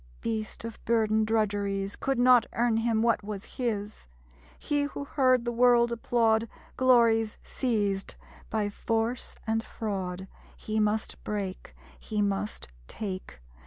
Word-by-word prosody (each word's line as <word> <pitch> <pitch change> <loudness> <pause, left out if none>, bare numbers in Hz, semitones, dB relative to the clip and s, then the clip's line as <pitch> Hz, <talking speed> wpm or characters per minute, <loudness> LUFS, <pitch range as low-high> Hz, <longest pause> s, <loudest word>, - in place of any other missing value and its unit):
Beast 220 -2 -3
of 230 -1 -8
burden 220 -1 +2
drudgeries 205 -2 0
Could 270 -1 -1
not 245 -1 +6
earn 235 -1 +2
him 225 -1 +1
what 230 -2 +2
was 205 -1 -6
his: 215 - -3 0.5
He 290 -1 0
who 285 - -5
heard 255 -4 +2
the 240 - 0
world 240 0 +4
applaud 230 -1 +2 0.3
Glories 230 -4 +4
seized 205 -6 -1 0.3
by 215 -2 0
force 225 +3 -2
and 225 0 0
fraud, 190 -5 -4 0.3
He 215 0 -2
must 215 +1 -1
break, 200 -3 -4 0.2
he 215 -2 -4
must 205 +1 -1 0.2
take! 185 - -6
220 Hz, 125 wpm, -28 LUFS, 205-235 Hz, 0.5 s, not